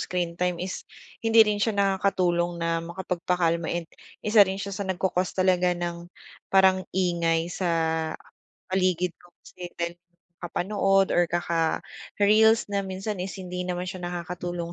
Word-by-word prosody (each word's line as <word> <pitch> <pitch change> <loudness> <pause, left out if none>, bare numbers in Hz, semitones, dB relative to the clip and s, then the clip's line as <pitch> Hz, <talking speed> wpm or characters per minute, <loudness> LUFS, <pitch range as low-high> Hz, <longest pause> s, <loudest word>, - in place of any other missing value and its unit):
screentime 180 0 -1
is 185 +2 -6 0.3
hindi 225 0 +6
rin 210 -1 -1
siya 220 -1 +1
nakakatulong 185 -3 +1
na 165 0 -1
makapagpakalma 170 -1 -1
and 175 0 -2 0.4
isa 215 0 +5
rin 190 -1 +5
siya 200 0 -5
sa 195 0 -4
nag-cau-cause 185 0 -1
talaga 180 -1 +2
ng 175 0 -5 0.4
parang 190 -1 +5
ingay 170 -2 0
sa 180 -1 -2 1.0
paligid 185 -2 0
ko 175 - -19 0.2
kasi 180 -1 -9
dahil 170 0 -2 0.5
kakapanood 195 +2 +1
or 175 - +4
kaka-reels 200 +6 +2
na 200 - +1
minsan 190 +1 -4
is 190 +2 -5
hindi 180 -1 -6
naman 180 0 -2
siya 185 0 -6
nakakatulong. 175 0 -5
180 Hz, 135 wpm, -26 LUFS, 175-195 Hz, 1.0 s, hindi